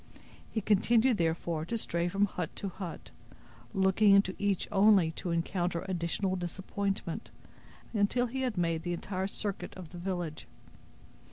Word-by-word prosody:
He 220 - -2
continued, 225 +4 +4
therefore, 165 -1 0
to 230 +7 -2
stray 170 -5 -1
from 200 +3 +2
hut 205 - -4
to 200 - -3
hut, 185 -2 -7 0.6
looking 195 +1 +5
into 200 -1 +4
each 200 -2 +1
only 195 -4 +5
to 175 - -5
encounter 170 +1 -1
additional 185 +1 -1
disappointment, 190 0 -3 0.6
until 220 +4 +2
he 260 +2 -3
had 250 -6 -1
made 165 -2 +1
the 175 +1 -2
entire 190 +2 -2
circuit 200 0 -4
of 180 -4 -9
the 175 - -9
village. 175 -4 -4
190 Hz, 145 wpm, -31 LUFS, 170-205 Hz, 0.6 s, looking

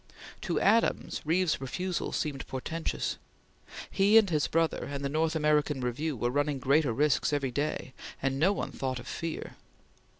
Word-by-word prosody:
To - - -1
Adams, 225 +3 +2
Reeve's 170 -1 +1
refusal 180 +7 -3
seemed 140 -3 -3
portentous. 160 +5 -3 0.7
He 205 +3 +5
and 220 -2 +6
his 150 -2 +2
brother 165 -1 0
and 140 0 -4
the - - 0
North 160 +2 0
American 150 -2 +2
Review 130 +4 -2
were 120 +2 0
running 145 +1 0
greater 140 +1 +2
risks 145 +5 +2
every 140 -3 0
day, 140 -1 -2 0.3
and 135 0 -1
no 180 +6 +4
one 205 - -3
thought 130 -1 -3
of 120 - -8
fear. 165 -1 -5
150 Hz, 160 wpm, -29 LUFS, 135-165 Hz, 0.7 s, and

